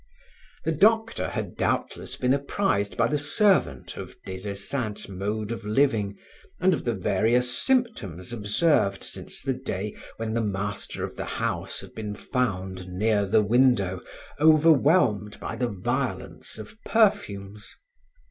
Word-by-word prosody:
The 160 - +2
doctor 225 +7 +3
had - - -4
doubtless - - -2
been 125 +1 +2
apprised 140 - 0
by 115 -1 +3
the 145 +5 0
servant 145 - +2
of - - -8
Des 95 +2 -5
Esseintes' 105 +2 -3
mode 105 +3 -3
of 115 -1 -5
living 105 -3 +1 0.4
and 185 +1 +4
of 155 - -3
the 120 -2 0
various 115 +7 +2
symptoms 125 - 0
observed 105 - +2
since - - -5
the 135 - 0
day 105 -6 -4 0.2
when 110 -1 -3
the 115 - +1
master 100 -1 -3
of - - -5
the - - -3
house - - -2
had - - -12
been 105 -2 -5
found 95 -7 -2
near 100 +2 +1
the 105 +2 +4
window, 105 -5 +3 0.4
overwhelmed 150 - +4
by - - -5
the 120 +1 -1
violence 100 -4 -3
of 110 - -10
perfumes. 105 - 0
110 Hz, 140 wpm, -26 LUFS, 100-140 Hz, 0.4 s, and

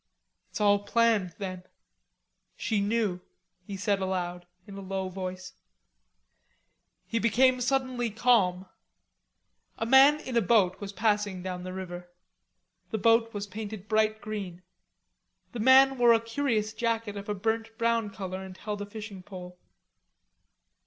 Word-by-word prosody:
"It's - - -6
all 205 -1 +4
planned, 205 -4 +1
then. 185 -2 -5 1.0
She 215 -4 0
knew," 205 -3 0 0.5
he 200 - -5
said 200 0 0
aloud 180 -2 -3 0.2
in 200 - -10
a 195 - -7
low 190 0 -3
voice. 185 -1 -6 1.5
He 230 - -1
became 250 +3 +3
suddenly 255 -2 0
calm. 200 -5 +2 1.1
A 225 - -2
man 270 +5 +6
in 260 -4 -6
a 235 - +4
boat 190 -3 +2
was 200 -1 -5
passing 205 -3 0
down 180 -1 -4
the 185 0 -6
river. 175 -1 -7 0.8
The 220 - -2
boat 230 +2 +3
was 205 -1 -4
painted 210 0 -7
bright 215 0 +1
green; 195 -4 -6 0.9
the 240 - -6
man 265 +2 +6
wore 240 -1 +7
a 225 - +4
curious 225 -2 -1
jacket 225 -2 -2
of 200 +1 -7
a 210 - -1
burnt 225 +2 -2
brown 230 -2 +1
color, 190 -2 -6
and 190 -1 -10
held 210 -1 -5
a 205 - -5
fishing 210 -2 -8
pole. 180 -1 -10
210 Hz, 140 wpm, -28 LUFS, 190-230 Hz, 1.5 s, wore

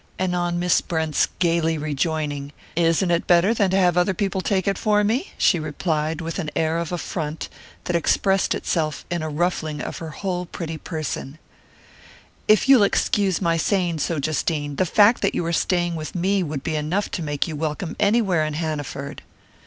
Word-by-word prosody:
And 185 -1 0
on 175 -1 0
Miss 175 0 +2
Brent's 160 -3 0
gaily 165 -2 +1
rejoining: 150 -1 -2 0.2
"Isn't 170 +2 +2
it 170 - +1
better 180 +5 +5
than 200 -4 +2
to 190 - +2
have 180 -2 +3
other 180 +2 +2
people 195 0 -1
take 190 -1 0
it 195 -1 0
for 210 -1 +2
me?" 240 - 0
she 175 - +3
replied, 155 +1 -2
with 165 +3 -4
an 160 -5 -2
air 160 +1 +1
of 170 0 -4
affront 160 -3 -4 0.3
that 175 - -2
expressed 195 +3 +2
itself 155 -4 -2
in 175 -2 -1
a 155 - -3
ruffling 155 -1 -1
of - - -5
her 165 - -6
whole 180 +2 -3
pretty 165 -2 -6
person: 155 -3 -5 1.1
"If 215 +3 +4
you'll 270 -4 +7
excuse 200 -2 +2
my 165 -1 +2
saying 175 -2 0
so, 165 +2 -1
Justine, 145 0 -1
the 185 - +2
fact 210 +7 +5
that 200 - +1
you 170 - -1
are 170 - -1
staying 175 0 +1
with 155 +1 -6
me 190 +3 +1
would 150 -5 -4
be 160 - -2
enough 155 +7 -1
to 175 - -3
make 145 -1 -1
you 160 - -4
welcome 155 +3 -3
anywhere 200 -6 +3
in 155 -1 -2
Hanaford!" 145 -3 -4
170 Hz, 185 wpm, -23 LUFS, 155-185 Hz, 1.1 s, you'll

